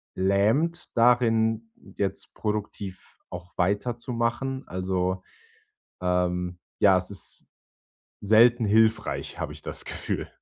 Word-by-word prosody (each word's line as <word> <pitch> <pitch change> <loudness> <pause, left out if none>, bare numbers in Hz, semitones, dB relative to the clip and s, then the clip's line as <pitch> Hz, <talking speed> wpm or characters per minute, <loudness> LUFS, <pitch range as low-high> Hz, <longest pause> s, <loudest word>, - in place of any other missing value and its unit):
lähmt 110 - +2
darin, 115 -2 +3 0.3
jetzt 100 -1 -2
produktiv 105 -3 -5
auch 90 +1 -9
weiterzumachen, 120 +6 -1
also, 95 0 -1 0.8
ähm, 90 0 0 0.2
ja, 95 -2 +6
es 90 +1 -4
ist 100 - -10 0.8
selten 115 +3 +5
hilfreich, 110 +1 +2
habe - - -3
ich - - -12
das - - -4
Gefühl. - - -3
105 Hz, 100 wpm, -26 LUFS, 95-115 Hz, 0.8 s, ja